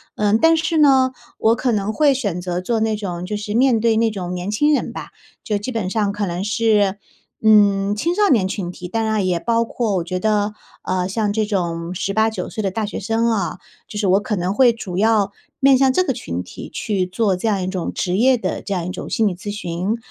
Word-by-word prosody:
嗯， 210 +1 +2
但 325 +6 +5
是 320 0 0
呢， 265 -4 +5 0.3
我 225 +1 +3
可 250 +1 0
能 210 -1 0
会 285 +5 +3
选 205 -10 -2
择 180 0 -3
做 225 +4 -1
那 220 -1 +1
种 180 -4 -5
就 210 - -3
是 210 0 -4
面 250 -1 +4
对 225 0 +2
那 225 0 +2
种 180 -4 -5
年 180 +3 -4
轻 295 +8 +2
人 - - -3
吧， - - -7 0.3
就 210 - -1
基 205 +6 -5
本 220 -6 -2
上 205 0 0
可 205 0 -2
能 175 +2 -3
是， 210 -2 +1 0.4
嗯， 205 -2 +4
青 330 +11 0
少 410 +2 +2
年 210 - +3
群 190 -2 -4
体。 180 0 -8
当 225 +4 -1
然 215 -3 0
也 180 -2 0
包 230 +4 +1
括 225 -3 -2
我 180 - 0
觉 185 +2 -3
得， 210 +1 +1 0.3
嗯， 185 0 -1
像 210 0 -1
这 220 0 +1
种 170 -3 -2
18-19 220 +4 0
岁 215 - -5
的 195 - 0
大 215 +3 -2
学 205 - -5
生 225 +3 0
啊， 195 -4 -1 0.3
就 210 - -8
是 210 - -1
我 190 +1 +4
可 210 +1 -2
能 180 0 -1
会 250 +2 +5
主 195 -5 -5
要 215 -2 +3 0.3
面 270 0 +6
向 270 -1 +4
这 365 +8 +2
个 275 - -1
群 90 - -5
体 - - -10
去 190 -4 -1
做 195 +1 0
这 180 +5 -3
样 200 -4 0
一 - - -2
种 185 -2 -3
职 180 0 -2
业 255 +3 +4
的 190 -4 -3
这 200 - -8
样 175 -2 -2
一 180 - -3
种 - - -7
心 225 - +1
理 185 - -2
咨 205 +3 -6
询， 190 +2 -3
210 Hz, 255 characters per minute, -20 LUFS, 185-225 Hz, 0.4 s, 面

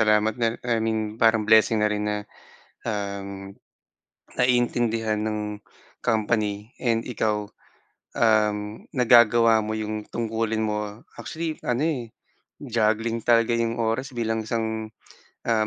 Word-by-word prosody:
pasalamat 105 0 +3
nala 115 0 +1
I 115 -2 +1
mean 110 -1 -2
parang 110 -1 +4
blessing 110 +1 +5
na 105 - +2
rin 105 0 -2
na 105 - 0 0.7
uhm, 100 -2 -4 0.8
naiintindihan 120 -3 +1
ng 105 -1 -3 0.4
company 110 -1 0
and 115 -2 -1
ikaw 105 -3 -1 0.7
uhm, 110 -2 +3 0.4
nagagawa 120 -2 +6
mo 110 0 -2
yung 110 -1 -4
tungkulin 115 -1 -2
mo. 105 0 -3 0.2
Actually, 160 -1 -4
ano 125 +2 +1
eh, 125 -8 -2 0.5
juggling 115 -2 0
talaga 115 0 +4
'yong 115 0 0
oras 115 +4 -2
bilang 115 -2 -2
isang, 110 -1 -3 0.5
ah, 110 -2 +1
110 Hz, 120 wpm, -25 LUFS, 105-115 Hz, 0.8 s, nagagawa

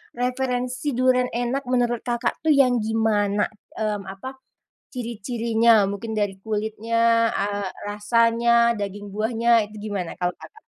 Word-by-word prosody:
referensi 250 +1 -2
duren 255 0 +3
enak 245 +3 -1
menurut 240 -2 +1
Kakak 240 0 -1
tuh 315 -1 +4
yang 250 -3 +4
gimana, 215 -2 +1 0.3
mmm, 215 -2 -1
apa, 195 +6 -8 0.6
ciri-cirinya 235 -1 0 0.2
mungkin 220 +3 -5
dari 205 -2 0
kulitnya, 220 +2 -3 0.4
eee, 200 0 -2 0.2
rasanya, 230 +3 +2 0.3
daging 205 0 -5
buahnya 225 +2 0 0.2
itu 215 - -12
gimana 195 -5 -3
kalau 180 -1 -1
Kakak? 440 0 -15
230 Hz, 125 wpm, -23 LUFS, 205-245 Hz, 0.6 s, tuh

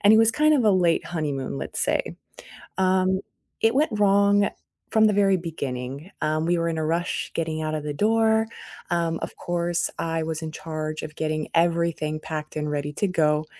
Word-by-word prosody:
and 205 - +8
it 220 - +7
was 225 0 +5
kind 305 +5 +4
of 255 -6 +2
a 210 - +6
late 180 -3 +3
honeymoon, 140 - -3
let's 65 - -4
say. - - 0 0.6
Um, 190 0 +2 0.4
it 225 +1 +4
went 295 +1 +3
wrong 200 0 +4 0.4
from 220 -1 +5
the 210 - +4
very 195 -2 +4
beginning, 140 -2 -5
um, 155 +1 0
we 175 - +2
were 165 0 0
in 165 -1 -1
a 155 - -1
rush 170 +3 -1
getting 160 -1 -2
out 155 0 -2
of 150 - -4
the 150 - -3
door, 220 +4 +3 0.4
um, 170 -2 0
of - - -5
course, 175 0 -1
I 165 -1 -1
was 160 0 -3
in 160 -1 -5
charge 155 -1 -5
of 155 - -7
getting 155 -1 -2
everything 165 -2 +1
packed 155 -1 -6
and 150 -1 -2
ready 145 0 -2
to 205 - 0
go, 155 -4 +2
165 Hz, 195 wpm, -25 LUFS, 155-195 Hz, 0.6 s, and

